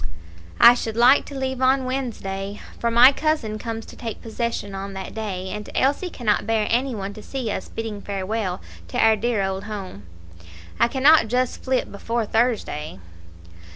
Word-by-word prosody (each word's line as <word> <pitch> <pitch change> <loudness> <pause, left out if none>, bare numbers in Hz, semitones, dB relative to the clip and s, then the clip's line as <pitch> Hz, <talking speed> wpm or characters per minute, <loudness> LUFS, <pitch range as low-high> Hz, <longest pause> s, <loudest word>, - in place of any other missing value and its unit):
"I 240 - +10
should 225 -2 -4
like 245 +4 +6
to 285 - -9
leave 265 -1 -3
on 260 0 +3
Wednesday, 210 -6 -4 0.2
for 235 - +1
my 240 +3 +8
cousin 275 -8 -1
comes 225 0 -5
to - - -12
take 230 -3 -6
possession 225 -3 -4
on 195 0 -5
that 190 0 -7
day, 195 -4 -4
and 210 +1 -6
Elsie 285 +7 +1
cannot 215 -8 0
bear 220 -1 +1
any 250 +1 +1
one 200 -1 -5
to 215 - -10
see 250 -2 -4
us 190 - -5
bidding 220 -2 -5
farewell 200 - -3 0.3
to 85 - -5
our 220 0 +5
dear 215 -1 0
old 190 0 -3
home." 190 - -7 0.7
"I - - +5
cannot 275 +1 +5
just 250 +2 -1
flit 260 -1 0
before 230 +3 -2
Thursday." 215 - -1
225 Hz, 170 wpm, -23 LUFS, 200-250 Hz, 0.7 s, I